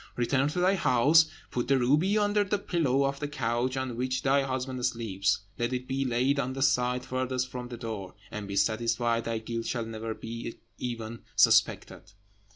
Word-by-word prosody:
Return 130 +3 +1
to 150 +4 -2
thy 185 +2 +4
house, 155 0 +5 0.2
put 120 - -2
the 135 - +4
ruby 150 - +3
under 205 0 +2
the 205 +1 0
pillow 150 -9 +1
of 140 0 -2
the 145 - -2
couch 125 -1 -1
on 130 -2 -3
which 130 +2 -2
thy 140 0 +3
husband 130 -1 -3
sleeps; 100 -5 0 0.2
let 120 +2 0
it 125 0 -3
be 135 +1 -1
laid 130 +3 +1
on 130 -1 -1
the 135 0 -1
side 125 -1 +2
furthest 130 0 -2
from 125 -1 -5
the 120 -1 -7
door; 110 -5 -6 0.2
and 105 -1 -5
be 100 - -4
satisfied 115 +3 +1
thy 115 -1 -1
guilt 115 +1 -4
shall 120 -2 -2
never 110 0 -5
be 115 0 -6 0.2
even 115 -2 -5 0.2
suspected." - - +3
125 Hz, 185 wpm, -28 LUFS, 115-135 Hz, 0.2 s, house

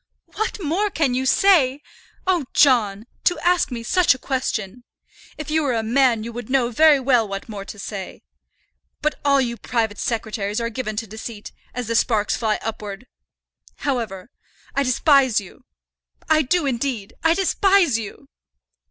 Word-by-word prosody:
"What 435 - -2
more 375 +5 0
can 295 -9 0
you 260 +1 -1
say? 295 -7 +4 0.4
Oh, 360 -6 +1
John! 225 -7 +3 0.2
to 355 - +2
ask 355 0 +2
me 235 -3 -5
such 355 +2 +3
a - - -9
question! 245 -4 -3 0.5
If 305 -1 -6
you 315 +1 +2
were 270 -5 0
a 225 - -1
man 235 -1 +2
you 235 +1 -7
would 240 0 -7
know 255 -2 +1
very 305 +3 +5
well 250 -4 +2
what 195 0 -6
more 205 -3 -7
to 205 - -9
say. 200 -2 -7 0.8
But 305 - 0
all 280 -1 +4
you 235 -3 -1
private 225 -4 -2
secretaries 220 -2 -2
are 230 0 -2
given 220 -2 -4
to 225 +2 -3
deceit, 220 0 -8 0.2
as 250 -1 -3
the 230 - -2
sparks 220 -2 +1
fly 220 -2 0
upwards. 210 0 -6 0.7
However, 230 -6 -3 0.4
I 280 - +1
despise 265 -2 +3
you, 205 +6 -14 0.6
I 315 -1 +4
do, 320 +3 +1
indeed. 240 -5 -2
I 325 +1 +4
despise 385 - +3
you." 225 +5 -9
245 Hz, 160 wpm, -22 LUFS, 220-290 Hz, 0.8 s, very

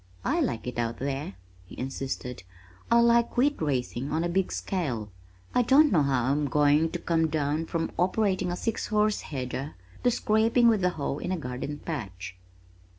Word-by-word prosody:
"I - - +1
like 115 - -1
it 125 -1 -4
out 115 0 -1
there," 135 -5 -3 0.3
he - - -12
insisted. 130 -3 -4 0.5
"I 235 0 +5
like 235 0 +3
wheat 285 0 +2
raising 135 -2 -2
on 160 +2 0
a 175 - -1
big 190 +1 0
scale. 125 - -3 0.4
I 250 - +4
don't 275 +5 +5
know 165 - +4
how 135 -2 +1
I'm 145 +1 +1
going 150 +3 +3
to - - -1
come 165 -1 +1
down 155 +1 -1
from 165 -1 -2
operating 185 0 +1
a - - -1
six 225 +3 -2
horse 215 0 +1
header 135 +1 -5 0.3
to 245 - +5
scraping 225 +1 +3
with 215 -5 +3
a 180 - +4
hoe 150 -4 -3
in 180 - -3
a 185 - 0
garden 135 0 -5
patch." 95 - -5
155 Hz, 180 wpm, -27 LUFS, 135-195 Hz, 0.5 s, I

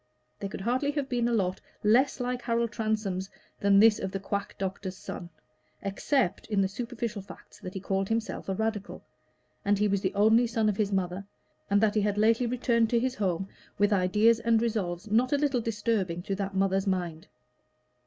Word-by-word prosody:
There 200 - -4
could 195 - -6
hardly 255 +7 0
have 285 -2 -2
been 240 -2 +1
a - - 0
lot 190 -4 0 0.2
less 255 +7 +3
like 250 0 -2
Harold 235 -1 0
Transome's 210 -4 -2 0.3
than 200 0 +4
this 215 0 +6
of 190 - -3
the 195 - -3
quack 200 +1 -3
doctor's 190 -1 -4
son, 175 - -7 0.5
except 200 - 0
in 210 -3 0
the 195 - +3
superficial 230 0 -4
facts 195 - -14
that 185 -2 -8
he - - -2
called 195 0 -1
himself 225 -3 -2
a 190 - 0
Radical, 220 -1 -3 0.6
that 205 0 +2
he 210 +1 +2
was 200 -1 0
the 190 +1 -1
only 220 +4 +5
son 225 -2 +1
of 200 - -1
his 205 -2 0
mother, 190 0 -1 0.5
and 200 0 +4
that 215 -2 +3
he 215 - +2
had 205 0 0
lately 225 +3 +3
returned 235 -2 +1
to 235 - +3
his 255 +1 0
home 195 -4 -1 0.3
with 205 +1 +3
ideas 210 +5 +4
and 230 -1 +3
resolves 210 -5 -2
not 245 +5 +3
a - - +4
little 280 -4 +1
disturbing 210 -6 -1
to 195 - -3
that 195 0 -3
mother's 195 0 +1
mind. 175 -4 -2
210 Hz, 195 wpm, -28 LUFS, 195-230 Hz, 0.6 s, this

